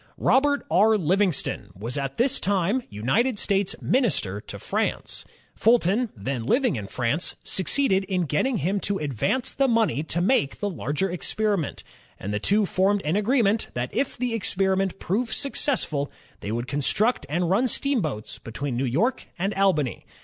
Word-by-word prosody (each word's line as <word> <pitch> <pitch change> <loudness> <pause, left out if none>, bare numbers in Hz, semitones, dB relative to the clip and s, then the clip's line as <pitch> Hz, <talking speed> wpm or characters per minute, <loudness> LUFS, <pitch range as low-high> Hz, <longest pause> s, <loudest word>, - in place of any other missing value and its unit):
Robert 285 +1 +2
R. 215 +6 +5
Livingston 180 - 0
was 115 +5 -3
at 135 -1 -3
this 260 +3 +2
time 200 +5 +1
United 205 - 0
States 200 -1 0
minister 170 - +1
to - - -8
France. - - -2 0.3
Fulton, 225 +1 +3
then 120 +4 -3
living 250 - +2
in 105 -4 -5
France, 125 - -1
suc 190 -4 -2
ceeded 195 -6 +2
in 185 -2 0
getting 195 - 0
him 195 +3 0
to 200 +1 -1
advance 150 - -1
the 275 -1 +2
money 225 - +2
to 160 +2 -2
make 175 - +2
the 205 -1 -2
larger 170 +3 -2
experiment, 200 -1 -1 0.4
and 100 +2 -4
the 105 - 0
two 205 - +2
formed 195 +2 +1
an 155 +4 +1
agreement 215 0 +2
that 120 +1 -3
if 280 - -1
the 245 -1 -1
experiment 190 -2 0
proved 225 +7 -1
successful, 255 - 0 0.3
they 100 - -5
would 120 +2 -2
construct 145 - +1
and 170 +3 0
run 235 +7 +3
steamboats 210 - -1
between 125 +3 -4
New 130 +3 0
York 210 - 0
and 195 +4 -1
Albany. 185 -10 +1
190 Hz, 160 wpm, -25 LUFS, 145-225 Hz, 0.4 s, R